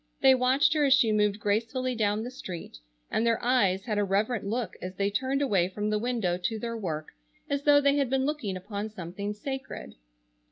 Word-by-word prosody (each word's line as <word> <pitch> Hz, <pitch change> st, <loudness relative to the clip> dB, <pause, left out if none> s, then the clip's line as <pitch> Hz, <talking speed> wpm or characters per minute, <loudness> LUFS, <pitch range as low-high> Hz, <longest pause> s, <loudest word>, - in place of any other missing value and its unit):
They 265 Hz, -1 st, +7 dB
watched 260 Hz, +4 st, +3 dB
her 305 Hz, -2 st, +2 dB
as 270 Hz, -1 st, +6 dB
she 235 Hz, -5 st, +3 dB
moved 210 Hz, -1 st, +2 dB
gracefully 230 Hz, +5 st, 0 dB
down 215 Hz, -2 st, 0 dB
the 245 Hz, -, -6 dB
street, 180 Hz, -, -8 dB, 0.3 s
and 220 Hz, -, +1 dB
their 230 Hz, -1 st, +3 dB
eyes 200 Hz, -7 st, +2 dB
had 210 Hz, -3 st, -1 dB
a -, -, +2 dB
reverent 205 Hz, +4 st, 0 dB
look 230 Hz, +2 st, -2 dB
as 185 Hz, +1 st, -6 dB
they 200 Hz, +1 st, 0 dB
turned 265 Hz, +5 st, 0 dB
away 195 Hz, -10 st, +2 dB
from 210 Hz, +2 st, -2 dB
the 210 Hz, -, +1 dB
window 220 Hz, -7 st, 0 dB
to 220 Hz, +4 st, -2 dB
their 230 Hz, +1 st, -4 dB
work, 160 Hz, -8 st, -4 dB, 0.4 s
as 280 Hz, 0 st, 0 dB
though 290 Hz, -1 st, +7 dB
they 280 Hz, 0 st, +3 dB
had 275 Hz, -3 st, +1 dB
been 265 Hz, 0 st, +1 dB
looking 270 Hz, -11 st, -2 dB
upon 205 Hz, +3 st, -5 dB
something 200 Hz, +1 st, -5 dB
sacred. 265 Hz, -, -6 dB
220 Hz, 205 wpm, -28 LUFS, 200-260 Hz, 0.4 s, They